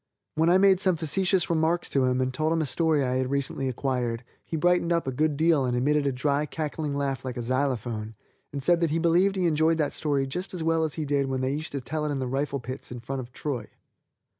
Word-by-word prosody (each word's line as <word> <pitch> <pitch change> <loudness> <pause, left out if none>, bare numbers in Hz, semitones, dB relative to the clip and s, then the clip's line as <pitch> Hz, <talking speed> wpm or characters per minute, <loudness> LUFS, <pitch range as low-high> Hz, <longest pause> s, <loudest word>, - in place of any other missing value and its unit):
When 160 +2 +2
I 180 - +6
made 190 -1 +5
some 185 -2 +3
facetious 180 +3 +1
remarks 165 +1 +1
to 135 -2 +2
him 125 0 +1
and 130 0 -1
told 155 +4 0
him 165 - +1
a - - -1
story 150 +2 +1
I 130 0 0
had 130 0 -1
recently 135 -1 -1
acquired, 125 -2 -2 0.2
he 165 - -4
brightened 175 +1 +2
up 170 -2 +1
a 135 - -1
good 150 +2 0
deal 160 -2 +3
and 125 -1 0
emitted 145 +3 +2
a - - +2
dry, 140 +3 0
cackling 150 -1 -3
laugh 135 -2 -2
like 125 -2 -5
a 120 - -3
xylophone, 120 -4 -2 0.4
and 140 -1 -5
said 175 +2 +4
that 170 -1 +1
he 155 - 0
believed 175 +4 +3
he 185 -2 0
enjoyed 160 0 +3
that 150 -3 0
story 145 -3 0
just 180 +8 -4
as 170 - -3
well 165 0 +2
as 155 - -2
he 155 - -3
did 140 -1 +1
when 130 -1 -2
they 130 +1 0
used 155 +2 -4
to 140 - -3
tell 155 +5 -3
it 150 - -1
in 140 - -1
the 130 - -2
rifle 140 +2 -2
pits 130 +1 -7
in 120 - -6
front 135 +3 -5
of 125 -1 -8
Troy. 135 -2 -4
145 Hz, 255 wpm, -26 LUFS, 130-165 Hz, 0.4 s, I